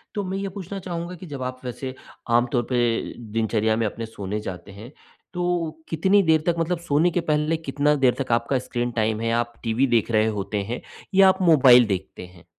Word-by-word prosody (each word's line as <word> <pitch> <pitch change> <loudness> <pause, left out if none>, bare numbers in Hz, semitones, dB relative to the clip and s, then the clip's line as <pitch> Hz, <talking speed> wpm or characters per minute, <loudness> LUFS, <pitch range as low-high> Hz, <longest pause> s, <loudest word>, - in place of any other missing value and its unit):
तो 205 - -1
मैं 190 +1 -3
ये 195 0 -3
पूछना 195 0 -7
चाहूँगा 175 -1 -5
कि 180 - -11
जब 140 -3 -7
आप 130 0 -5
वैसे 130 +1 -5 0.4
आम 120 +1 +4
तौर 120 -1 +1
पे 125 - 0 0.5
दिनचर्या 110 0 +1
में 115 - 0
अपने 115 +2 -5
सोने 105 -2 -5
जाते 95 -1 -7
हैं, 110 +6 -11 0.4
तो 175 -2 -1 0.2
कितनी 190 +5 +3
देर 160 -2 +3
तक 170 - +3
मतलब 165 +1 -1
सोने 170 +1 +2
के 175 - 0
पहले, 155 0 0
कितना 150 -1 0
देर 130 -3 +3
तक 130 - -3
आपका 120 +3 +1
स्क्रीन 120 -1 -3
टाइम 110 -2 0
है, 115 0 0
आप 120 0 -1
टीवी 120 +4 +1
देख 120 -1 +1
रहे 110 0 +3
होते 100 +1 -2
हैं, 125 - -4 0.3
या 195 -1 +7
आप 190 +1 0
मोबाइल 130 -8 +7
देखते 95 -2 -4
हैं? 90 -2 -19
130 Hz, 210 wpm, -23 LUFS, 115-165 Hz, 0.5 s, या